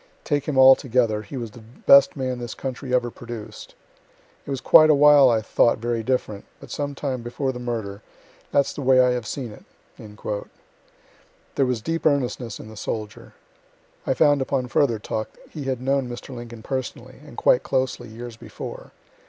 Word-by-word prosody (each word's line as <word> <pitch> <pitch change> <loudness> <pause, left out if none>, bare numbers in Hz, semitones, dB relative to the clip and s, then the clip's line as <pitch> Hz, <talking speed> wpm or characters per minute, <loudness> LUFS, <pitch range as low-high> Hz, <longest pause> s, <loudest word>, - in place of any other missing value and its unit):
Take 145 -2 -1
him 145 -3 -1
altogether, 125 -4 +5
he 110 +6 -8
was 115 -3 -5
the 120 - -13
best 130 +6 +4
man 130 -2 -2
this 120 -2 -6
country 130 0 -6
ever 125 -1 +1
produced. 120 - -9 0.7
It - - -8
was 135 -2 -2
quite 155 +4 +7
a 155 - +6
while 145 -2 +7
I 110 -2 +1
thought 115 - +3
very 115 0 -2
different; 110 -4 -2
but - - -13
some 145 -1 -3
time 135 -3 -3
before 125 +3 -3
the 125 - -8
murder, 110 -5 -4 0.5
that's 140 - +2
the - - -6
way 130 -1 +4
I 125 0 +5
have 120 -3 -3
seen 125 -3 -5
it." - - -14 1.9
There 135 - +2
was 125 -3 -1
deep 165 0 -2
earnestness 125 -5 -1
in - - -10
the 110 - -11
soldier. 105 0 -6 0.7
(I 130 - +1
found 145 -2 +4
upon 130 -1 -1
further 125 -4 +2
talk 110 +1 -5
he 145 -3 -7
had 130 -2 -2
known 135 0 0
Mr. 120 +2 -8
Lincoln 120 -2 -9
personally, 130 -1 -5
and 150 - -14
quite 125 - +4
closely, 130 -2 -2
years 115 +1 -9
before.) - - -9
125 Hz, 175 wpm, -23 LUFS, 115-135 Hz, 1.9 s, quite